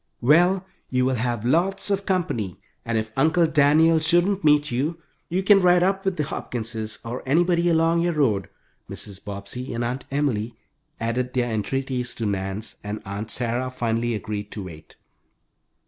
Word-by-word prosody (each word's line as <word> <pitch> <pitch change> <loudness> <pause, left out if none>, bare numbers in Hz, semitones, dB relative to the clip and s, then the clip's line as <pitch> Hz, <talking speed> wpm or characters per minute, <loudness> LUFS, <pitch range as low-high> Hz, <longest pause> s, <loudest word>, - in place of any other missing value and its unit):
"Well, 175 +8 +4 0.2
you 125 0 +1
will 130 - +1
have 120 -2 -2
lots 190 +9 +1
of 200 0 -1
company, 160 - -1 0.2
and 115 -1 -1
if 110 0 -2
Uncle 160 +5 +3
Daniel 160 +1 +4
shouldn't 175 +4 +2
meet 150 -2 +4
you, 150 +7 -1 0.3
you 185 +3 0
can 195 0 +6
ride 180 -1 +5
up 195 +1 0
with 190 -2 0
the 150 - +1
Hopkinses 110 -5 -4
or 120 +2 -4
anybody 170 +4 +3
along 165 0 +3
your 175 0 +1
road." 110 - +1 0.4
Mrs. 100 -2 -7
Bobbsey 105 +6 -6
and 120 - -1
Aunt 125 +2 -3
Emily 120 -6 -1 0.4
added 125 +2 -2
their 120 -2 0
entreaties 125 +3 -2
to 115 - -3
Nan's, 100 +1 -3
and 105 +1 -4
Aunt 100 +3 -5
Sarah 125 +2 -1
finally 120 -2 -1
agreed 105 -1 -5
to 105 - -5
wait. 80 -4 -11
130 Hz, 165 wpm, -24 LUFS, 110-165 Hz, 0.4 s, can